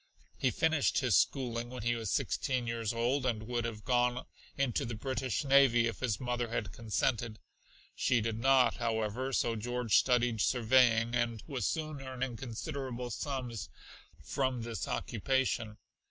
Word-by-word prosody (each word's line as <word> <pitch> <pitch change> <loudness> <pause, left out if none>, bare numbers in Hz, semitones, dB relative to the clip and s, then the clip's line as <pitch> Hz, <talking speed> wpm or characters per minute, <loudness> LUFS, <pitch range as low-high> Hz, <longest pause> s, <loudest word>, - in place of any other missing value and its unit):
He 130 - +1
finished 160 +2 +1
his 125 -7 +3
schooling 120 -3 +1
when 125 -2 -7
he 120 +1 +2
was 115 -3 -3
sixteen 125 +4 0
years 115 -2 -2
old, 120 +4 0
and 115 -4 -1
would 120 +1 -2
have 110 -2 -5
gone 125 0 +1 0.3
into 135 -4 0
the 115 0 -4
British 130 +1 -2
navy 135 -4 +5
if 115 - -3
his 115 -5 -1
mother 120 -1 -1
had 110 -4 -3
consented. 115 +2 -1 0.6
She 125 - +2
did 110 0 -2
not, 135 0 +4
however, 115 +2 -1
so 120 -2 +1
George 120 -1 -1
studied 125 -3 +2
surveying; 120 -1 +3
and 120 -2 -1
was 130 -7 -2
soon 155 -3 -3
earning 130 -2 -4
considerable 125 0 -5
sums 125 - -4 0.5
from 130 -3 -1
this 115 -1 -4
occupation. 115 -2 -1
120 Hz, 150 wpm, -32 LUFS, 115-130 Hz, 0.6 s, navy